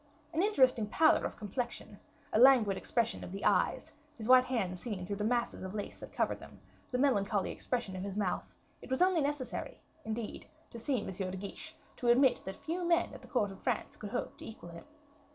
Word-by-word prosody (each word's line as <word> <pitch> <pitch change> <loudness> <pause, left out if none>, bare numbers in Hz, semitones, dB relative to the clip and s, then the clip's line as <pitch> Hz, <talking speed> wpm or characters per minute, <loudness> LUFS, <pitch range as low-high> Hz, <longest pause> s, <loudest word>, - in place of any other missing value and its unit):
An 325 - +2
interesting 260 - +4
pallor 315 +9 +4
of - - -4
complexion, 240 +3 -5 0.3
a - - +4
languid 245 -6 +7
expression 235 +2 -1
of - - -7
the 195 +1 -5
eyes, - - +2 0.2
his 220 -2 -6
white 255 0 +8
hands 190 -8 -1
seen 200 -5 -4
through 200 +2 -3
the 210 - -2
masses 240 +2 0
of 190 +2 -6
lace 205 - -5
that - - -10
covered - - 0
them, - - -13 0.3
the 250 - -1
melancholy 205 -7 +2
expression 235 -7 -3
of 185 - -4
his 195 +1 -4
mouth 195 -4 -2 0.2
it - - -11
was 260 +6 +3
only 365 -3 +3
necessary, 285 -2 -3 0.2
indeed, 220 0 -5 0.2
to 235 - -7
see 255 +2 0
M. - - -7
de 185 0 -4
Guiche 290 +11 -7 0.2
to 245 - -3
admit 255 +2 +5
that 190 - -5
few 345 +3 -3
men 340 0 +2
at - - -10
the - - -13
court 210 -7 0
of 195 - -12
France - - -1
could 210 - -7
hope 245 - -4
to - - -8
equal 215 -6 -9
him. 170 - -10
235 Hz, 210 wpm, -33 LUFS, 200-260 Hz, 0.3 s, white